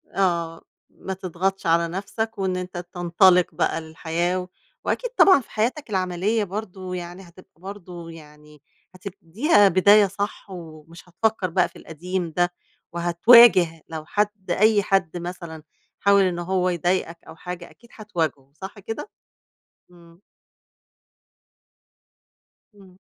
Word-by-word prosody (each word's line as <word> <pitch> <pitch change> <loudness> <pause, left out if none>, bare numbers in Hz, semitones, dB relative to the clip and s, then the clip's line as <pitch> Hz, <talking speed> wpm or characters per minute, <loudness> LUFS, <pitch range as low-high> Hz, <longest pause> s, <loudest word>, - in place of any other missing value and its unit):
آه، 170 -4 0 0.3
ما 190 - -7
تضغطش 190 +1 -3
على 170 0 +3
نفْسك 210 +5 -4
وإن 190 -2 -1
أنت 180 -1 -6 0.2
تنطلق 175 0 +3
بقى 165 0 0
للحياة، 170 +3 -3 0.4
وأكيد - - -2
طبعًا 375 -7 +7
في - - -20
حياتك 240 +5 -2
العملية 190 +3 0
برضه 190 -2 -6
يعني 175 +1 -7
هتبقى 175 -1 -19
برضه 180 -3 -9
يعني 150 -2 -15 0.3
هتبتديها 200 - +2
بداية 200 +3 +5
صح 200 +1 -5
ومش 165 -1 -12
هتفكّر 205 0 -1
بقى 180 +2 +1
في - - -29
القديم 175 +1 -5
ده 175 +2 0 0.4
وهتواجه 175 -1 +5
لو 160 -1 -6
حد 205 -1 -2
أي 210 +2 +3
حد 185 -4 0
مثلًا 170 -2 -7 0.4
حاول 200 0 +4
إن 180 -2 -1
هو 185 +1 0
يضايقك 175 0 -1
أو 160 - -11
حاجة 180 +1 -8
أكيد 235 - -21
هتواجهه، 160 -10 -4
صح 195 +2 -8
كده؟ 225 - -7 0.8
إمم. 170 -1 -19 2.6
إمم. 190 -2 -18
180 Hz, 120 wpm, -23 LUFS, 170-200 Hz, 2.6 s, طبعًا